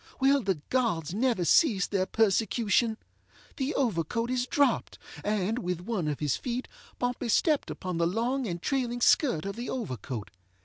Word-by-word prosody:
Will 275 +1 +4
the 190 -7 -1
gods 200 - 0
never 225 -4 +1
cease 210 - +4
their 190 -2 -1
persecution? 220 +1 +2 0.6
The 275 +3 -1
overcoat 230 - 0
is 250 0 0
dropped, 285 +1 +1 0.3
and, 210 +2 0
with 180 -5 -3
one 185 -4 -2
of 150 -2 -2
his 145 -4 +1
feet, 250 0 -4 0.3
Pompey 245 -1 -2
stepped 300 +6 +2
upon 185 -3 -4
the 170 - +3
long 240 +7 -1
and 175 -2 -3
trailing 245 +2 -1
skirt 235 - +3
of 200 - -4
the 240 +2 -5
overcoat. 130 - -5
225 Hz, 160 wpm, -28 LUFS, 180-250 Hz, 0.6 s, Will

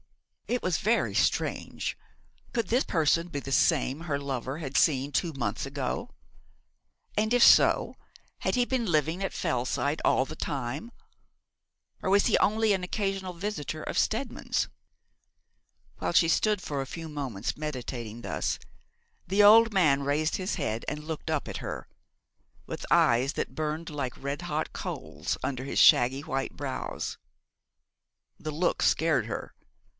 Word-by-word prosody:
It 245 +1 -1
was 185 -3 +1
very 220 +3 +1
strange. - - 0 0.6
Could 230 -5 -1
this 245 +6 +2
person 165 +1 +1
be 145 -4 -3
the 135 - -7
same 145 -1 +2
her 150 -4 -2
lover 135 -1 -3
had 140 -5 -6
seen 140 -2 +3
two 170 +3 0
months 135 -1 -2
ago? 140 - -3 1.1
And, 215 +2 +1
if 245 - +4
so, - - +6 0.4
had - - 0
he 245 -1 +3
been 250 -2 0
living 160 +3 +1
at 195 - -1
Fellside 130 +4 -1
all 130 - +3
the - - -8
time; 140 - -4 1.1
or - - -1
was 200 +1 +4
he - - +4
only 220 0 +3
an 190 -2 -1
occasional 195 -1 -2
visitor 170 -4 -4
of - - -4
Steadman's? 230 +6 0 1.3
While - - -1
she 170 -1 +5
stood 210 +4 +2
for 145 -4 -3
a 135 - -5
few 165 +4 -7
moments 135 -9 -4
meditating 125 -6 -5
thus, - - -2 0.7
the 200 +3 +4
old 225 +2 +8
man 150 -8 +3
raised 150 +3 +1
his 185 0 -2
head 115 - -2
and 150 0 -6
looked 160 0 -5
up 155 -2 -1
at - - -4
her, - - -6 0.8
with - - -6
eyes 125 +5 +4
that - - -4
burned 155 +1 -3
like 140 -5 -4
red 140 +1 -3
hot - - -3
coals 75 0 -4
under 130 -2 -2
his 140 - -1
shaggy 130 +3 +6
white 135 -3 -3
brows. 135 -2 -4 1.2
The 155 - -5
look 165 +4 0
scared 150 -9 +2
her. 110 - -5
155 Hz, 150 wpm, -28 LUFS, 135-190 Hz, 1.3 s, old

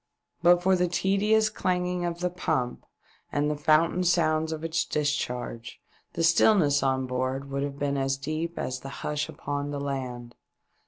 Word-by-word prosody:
But 175 +1 +5
for 190 +1 +4
the 180 0 +1
tedious 210 +5 +2
clanging 180 -2 -1
of 170 0 -3
the 180 0 0
pump 130 -8 -2 0.4
and 145 +1 +1
the - - -1
fountain 155 +4 +3
sounds 160 -3 +2
of 160 0 -5
its 165 0 0
discharge, 125 -5 -3 0.3
the 165 - -1
stillness 165 -4 +4
on 130 -1 +1
board 130 +2 -3
would 140 0 -1
have 140 0 -3
been 140 -1 -1
as 135 0 0
deep 155 +4 -4
as 130 0 -3
the 135 - -8 0.2
hush 150 -1 -1
upon 145 0 -4
the 145 -1 -3
land. 130 -4 -4
150 Hz, 165 wpm, -27 LUFS, 135-175 Hz, 0.4 s, But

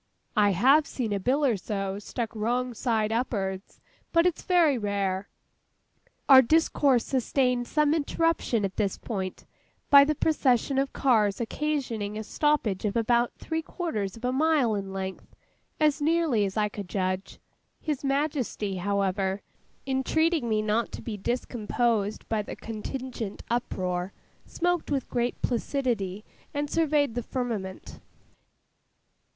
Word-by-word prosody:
I 205 -2 +4
have 275 - +5
seen 230 -5 -2
a 200 - 0
bill 270 +9 +1
or 245 -5 +3
so 195 0 -3
stuck 225 +2 -5
wrong 245 +3 -1
side 220 -2 0
up'ards. 200 -5 -2 0.3
But 335 0 +4
it's 360 -3 +1
very 345 -6 +4
rare.' 200 -3 -1 1.0
Our 265 -2 +10
discourse 280 -2 +3
sustained 250 -1 +1
some 300 -1 +2
interruption 320 -7 +1
at 195 - -5
this 200 -3 0
point, 190 -5 -5 0.5
by 280 0 +10
the 305 +2 +1
procession 270 -3 +2
of 275 0 0
cars 215 -7 +2
occasioning 235 -5 -2
a 215 - -4
stoppage 255 -6 0
of 210 -2 -1
about 235 +1 +2
three 320 0 -3
quarters 230 - -4
of 235 - -6
a 250 - +1
mile 280 -4 +2
in 195 -2 -3
length, 190 0 -6 0.4
as 305 -1 +2
nearly 310 -8 +2
as 195 +2 -4
I 210 -1 +2
could 205 -3 -7
judge. 185 0 -2 0.4
His 300 -4 -3
Majesty, 275 -8 -1
however, 195 0 -1 0.4
entreating 275 +1 +1
me 215 -1 +1
not 215 +2 0
to - - -7
be 225 - -4
discomposed 225 -1 -1
by 220 -2 0
the 205 - -7
contingent 225 -1 -6
uproar, 185 -6 -2 0.3
smoked 355 -1 -1
with 275 -3 -1
great 240 0 -1
placidity, 230 -6 -1 0.3
and 290 0 -2
surveyed 300 -5 +2
the 245 - -2
firmament. 225 -7 -4
235 Hz, 135 wpm, -27 LUFS, 205-280 Hz, 1.0 s, Our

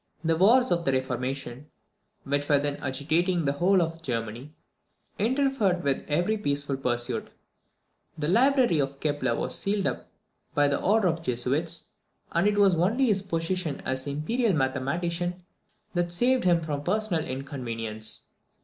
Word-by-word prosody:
The 165 0 +2
wars 235 +9 +5
of 170 -1 +1
the 135 - +1
reformation, 130 +1 -3 0.6
which 145 +1 -1
were 145 - +5
then 145 0 -1
agitating 160 +6 0
the 140 - +2
whole 180 +5 +3
of 165 0 -5
Germany, 120 0 -4 0.7
interfered 230 -6 +1
with 140 -1 0
every 175 +9 +1
peaceful 140 -5 -1
pursuit. 120 -2 -2 0.9
The 150 -1 -2
library 245 - +4
of 140 0 -2
Kepler 145 -6 0
was - - -2
sealed 200 0 0
up - - -2 0.5
by 145 -1 +3
order 210 0 +2
of 165 -2 +1
the 165 -7 -2
Jesuits, 140 +8 0 0.4
and 170 +4 +2
it 210 0 +1
was 200 -2 +5
only 200 +11 +2
his 205 -5 +2
position 165 -4 -2
as 130 +1 -1
imperial 200 - 0
mathematician 170 +6 -1 0.5
that 175 -1 0
saved 245 +7 +2
him 170 -2 +4
from 150 -3 -3
personal 185 -2 0
inconvenience. 115 -6 -4
160 Hz, 145 wpm, -27 LUFS, 135-190 Hz, 0.9 s, wars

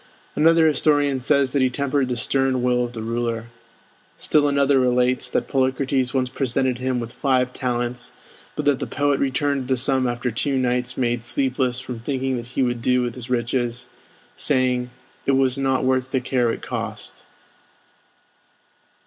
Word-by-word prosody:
Another 165 +2 +5
historian 145 -3 +2
says 135 0 +2
that 140 - +2
he 130 - +3
tempered 140 0 -1
the 125 - -1
stern 130 +1 +1
will 125 0 +2
of 120 0 -5
the 110 -2 -5
ruler. 115 0 -3 0.7
Still 150 -1 +2
another 140 -1 +3
relates 125 0 +1
that - - -1
Polycrates 130 -1 0
once 130 -2 0
presented 130 -1 -1
him 130 -1 -1
with 115 0 -6
five 130 -2 +1
talents, 125 0 -2 0.4
but 150 - -3
that 145 -3 +3
the - - -3
poet 145 0 0
returned 140 0 0
the 130 -1 +1
sum 130 0 +2
after 120 +1 -2
two 135 +5 -1
nights 125 -1 -1
made 120 -2 0
sleepless 130 0 0
from 125 -2 -6
thinking 130 +1 -2
what 120 -1 -5
he 130 +2 -1
would 120 -1 -1
do 125 +1 +2
with 120 -1 -3
his 125 0 -7
riches, 120 0 -1 0.5
saying 125 -3 +1 0.4
"it 135 - +3
was 135 0 +2
not 135 -1 +1
worth 130 0 +1
the 130 - 0
care 125 -2 0
it - - -6
cost." - - -5
130 Hz, 165 wpm, -22 LUFS, 125-135 Hz, 0.7 s, Another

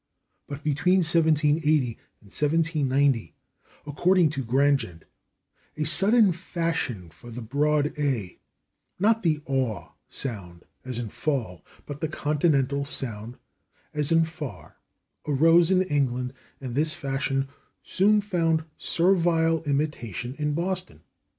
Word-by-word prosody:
But 145 +1 -7
between 180 +6 +2
1780 155 -5 +2 0.2
and 100 - -19
1790, 145 - +1 0.5
according 170 +3 +2
to 140 -3 -3
Grandgent, 130 - +1 0.7
a 155 - 0
sudden 200 +7 +4
fashion 165 - -3
for 120 - -14
the 120 +1 -7
broad 145 +4 +1
/a/ 130 -11 -2 0.6
(not 220 +4 +2
the 155 -4 +1
/aw/ 130 -6 -2 0.2
sound, 95 -9 -6 0.2
as 125 -2 -5
in 120 -3 -4
/fall/, 115 - -3 0.2
but 145 +1 -8
the 160 - 0
Continental 145 -2 0
sound 120 -4 -4 0.6
as 150 +1 -1
in 165 0 +5
/far/) 160 -4 -7 0.5
arose 165 +4 +5
in 185 -1 +4
England, 130 -6 -1 0.3
and 130 -3 -6
this 155 +4 +1
fashion 135 0 -2 0.4
soon 210 +3 +3
found 165 -5 0 0.2
servile 165 -2 +2
imitation 140 - -2
in 150 -1 -1
Boston. 175 - -3
150 Hz, 115 wpm, -26 LUFS, 130-165 Hz, 0.7 s, in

